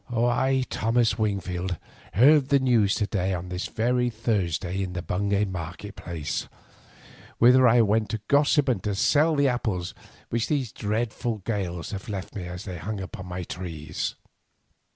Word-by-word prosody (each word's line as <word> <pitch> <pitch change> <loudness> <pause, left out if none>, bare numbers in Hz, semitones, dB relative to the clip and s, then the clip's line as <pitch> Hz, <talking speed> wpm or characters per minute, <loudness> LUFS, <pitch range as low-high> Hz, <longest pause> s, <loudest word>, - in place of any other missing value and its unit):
I, 125 +3 +2
Thomas 115 -1 +1
Wingfield, 95 -4 -1 0.4
heard 140 +5 +5
the 140 - +5
news 120 -7 +3
to 105 - 0
day 95 -2 -1
on 90 +1 -6
this 90 +1 -3
very 125 +2 +1
Thursday 100 -5 -1
in 95 -2 -3
the 90 -1 -4
Bungay 100 +2 0
market 95 +2 -6
place, 80 -3 -4 0.9
whither 125 +2 +6
I 120 +1 +6
went 110 0 +2
to 110 - -1
gossip 145 0 +4
and 120 -8 +1
to 105 -1 -1
sell 155 +9 +3
the 140 -1 +3
apples 105 -8 -1 0.4
which 115 0 0
these 135 -7 -1
dreadful 110 0 -2
gales 90 -6 -3
have 100 +1 -6
left 95 -3 -5
me, 100 -4 -5
as 90 +2 -7
they 90 -4 -6
hang 105 +5 -4
upon 95 0 -7
my 90 0 -4
trees. 85 -4 -5
105 Hz, 160 wpm, -26 LUFS, 90-120 Hz, 0.9 s, whither